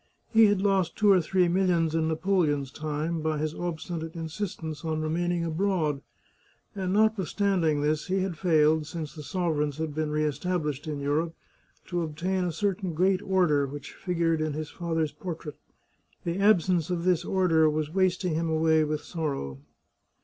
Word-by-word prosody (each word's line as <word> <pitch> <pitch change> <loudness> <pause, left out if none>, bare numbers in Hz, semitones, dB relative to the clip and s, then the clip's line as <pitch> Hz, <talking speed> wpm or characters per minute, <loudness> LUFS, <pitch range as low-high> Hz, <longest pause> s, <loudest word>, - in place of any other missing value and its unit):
He 225 -1 +7
had 205 -2 +2
lost 190 -4 +2
two 210 -2 +4
or 185 -2 +5
three 180 +2 +2
millions 170 -3 +2
in 160 -1 +1
Napoleon's 160 -5 +1
time, 155 +2 -3
by 155 0 0
his 155 +1 -2
obstinate 165 -1 -5
insistence 160 -2 -5
on 160 -1 -1
remaining 170 +2 0
abroad, 165 -4 0 0.7
and 190 -3 -2
notwithstand 200 -2 +2
ing 150 -1 +1
this 150 +2 0
he 190 0 +1
had 185 -2 -2
failed, 155 -2 +3
since 160 -3 -6
the 155 - -8
sovereigns 150 -3 -1
had 160 -2 -3
been 155 0 -1
re 150 0 0
established 150 -1 -2
in 150 -2 -3
Europe, 155 +4 0 0.5
to 175 -1 -2
obtain 175 +4 -1
a 175 - -1
certain 190 0 -2
great 185 +3 +2
order 165 -7 +2
which 145 +1 -8
figured 165 -3 0
in 155 -1 -1
his 155 0 -5
father's 165 -3 -1
portrait. 165 -4 -7 0.6
The 170 +2 -2
absence 185 -4 +3
of 175 -2 -1
this 180 -2 +2
order 170 -4 +3
was 155 0 -2
wasting 185 -2 +1
him 165 +1 -1
away 160 0 +3
with 150 0 -2
sorrow. 140 - -4
165 Hz, 165 wpm, -27 LUFS, 155-185 Hz, 0.7 s, He